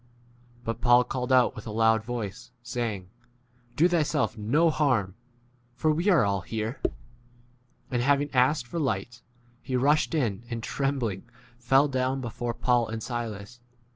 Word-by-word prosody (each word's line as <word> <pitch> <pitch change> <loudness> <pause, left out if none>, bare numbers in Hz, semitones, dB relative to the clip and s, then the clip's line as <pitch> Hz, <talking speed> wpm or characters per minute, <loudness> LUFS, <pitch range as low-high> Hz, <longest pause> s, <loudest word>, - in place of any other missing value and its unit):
But 115 0 -4
Paul 120 0 +6
called 125 0 -4
out 130 -1 +4
with - - -9
a - - -4
loud 110 0 +3
voice, 115 -1 -5
saying, 110 -7 -4 0.6
Do 165 +6 +5
thyself 150 - 0
no 140 +10 +2
harm, 125 -12 +1 0.6
for 155 - +1
we 165 +4 -1
29 195 -4 +5
are 120 - +3
all 100 -1 0
here. 110 +5 -4 1.1
And 120 -1 0
having 145 +2 +1
asked 130 +1 +3
for 145 +8 -5
lights, 120 -3 -2 0.4
he 130 +2 -4
rushed 145 +5 +2
in, 115 -8 -1
and, 115 -2 -4
trembling, 125 -9 -2 0.3
fell 135 +4 +4
down 130 0 -1
before 120 -1 -4
Paul 120 -2 +2
30 110 - -7
and 110 -1 -4
Silas. 120 -1 -5
120 Hz, 155 wpm, -27 LUFS, 110-135 Hz, 1.1 s, Paul